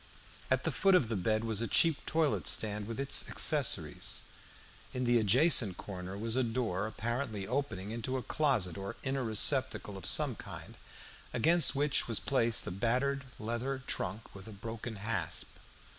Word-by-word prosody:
At - - +2
the - - 0
foot 195 -1 +4
of 135 -11 +3
the 115 - -1
bed 110 +3 0
was 110 -1 0
a 115 - -1
cheap 165 +3 +3
toilet 155 -3 +1
stand, 105 -1 0
with 115 +2 -5
its 140 0 +1
accessories. - - 0 0.7
In 125 - -1
the 120 -1 +4
adjacent 115 - +3
corner 95 -1 -7
was 115 +2 0
a 130 - +3
door 115 -5 -1
apparently 110 -2 -3
opening 110 -5 -3
into 120 +3 -2
a 125 - -4
closet 110 - 0
or 100 +4 -5
inner 135 -1 -1
receptacle 110 -2 +2
of 95 - -5
some - - +4
kind, - - -10 0.6
against 160 +5 +4
which 145 +1 +2
was 115 -3 +2
placed 120 -4 +2
a - - -4
battered 130 +8 0
leather 120 +4 -3
trunk 100 +5 -4
with 95 +1 -11
a - - -8
broken 110 +2 -6
hasp. 105 0 -2
115 Hz, 165 wpm, -32 LUFS, 105-135 Hz, 0.7 s, foot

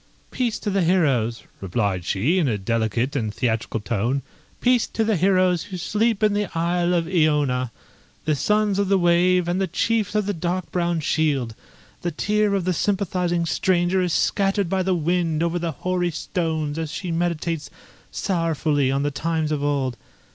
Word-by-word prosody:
"Peace 240 -4 -1
to 205 - -3
the 195 0 +1
heroes," 140 -10 +1 0.2
replied 95 -2 -1
she, 130 - +1
in 160 - +2
a 110 -4 0
delicate 115 +5 -1
and 110 -6 -1
theatrical 115 0 -1
tone; 115 +5 -1 0.4
"peace 250 -2 +3
to 225 - -1
the 220 -1 +1
heroes 185 -1 +2
who 190 -3 -6
sleep 215 +4 0
in 210 -1 +4
the 205 -1 -1
isle 175 +1 +1
of 170 -1 +1
Iona; 150 -8 +1 0.5
the 155 - +2
sons 210 +6 +1
of 200 - +1
the 195 - +4
wave, 175 0 +3
and 180 +2 0
the 190 - +1
chiefs 215 +3 0
of 210 -1 +2
the 205 - -1
dark 180 +1 -3
brown 175 -2 0
shield! 145 -7 0 0.5
The 175 - -1
tear 210 +5 +1
of 190 -3 -1
the 185 - +1
sympathising 180 -2 0
stranger 180 +2 +1
is 180 -1 0
scattered 195 +1 +1
by 190 0 +1
the 185 0 +1
wind 165 -1 0
over 170 +1 0
the 170 -1 -2
hoary 180 +4 -1
stones 160 -2 -2
as 160 -2 -3
she 180 -3 -4
meditates 165 -2 -2 0.4
sorrowfully 160 -6 0
on 135 +1 0
the 145 - 0
times 160 +1 -1
of 145 -2 -1
old! 135 -4 0
170 Hz, 175 wpm, -23 LUFS, 145-185 Hz, 0.5 s, in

